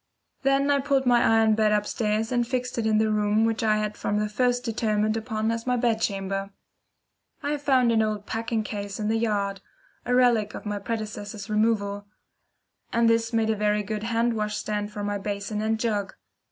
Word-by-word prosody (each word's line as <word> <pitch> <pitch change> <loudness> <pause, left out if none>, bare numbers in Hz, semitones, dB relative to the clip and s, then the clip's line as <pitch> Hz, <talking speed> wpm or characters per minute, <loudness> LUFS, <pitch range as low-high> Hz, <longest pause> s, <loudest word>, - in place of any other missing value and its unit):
Then 275 +1 +2
I 280 - +3
pulled 275 -1 +1
my 245 -1 +4
iron 225 -1 +4
bed 215 0 +2
upstairs 210 +1 0
and 240 -1 +1
fixed 250 -1 -2
it 220 - 0
in 215 -1 +3
the 215 0 +2
room 210 +1 +2
which 225 0 0
I 215 -1 +3
had 215 0 -2
from 205 - -1
the 210 0 0
first 245 +3 +1
determined 215 -2 0
upon 220 -1 -1
as 230 +1 -4
my 250 0 +2
bedchamber. 195 -4 -1 0.9
I 295 +1 0
found 260 -4 +3
an 225 -1 +3
old 215 -1 -2
packing 225 0 -2
case 205 -1 -5
in 210 0 -1
the 225 0 +1
yard 200 -3 -1 0.4
a 245 - 0
relic 235 -4 +3
of - - -8
my 205 -1 -2
predecessor's 210 -1 -5
removal 205 -2 0 0.8
and 235 0 +3
this 230 0 +2
made 225 -1 +1
a - - 0
very 210 0 +1
good 210 +1 -4
wash 235 - -3
hand 225 -2 +1
stand 210 -1 -3
for 210 -1 -5
my 205 0 -2
basin 205 +1 -3
and 220 0 0
jug. 210 -4 -1
220 Hz, 195 wpm, -26 LUFS, 210-230 Hz, 0.9 s, my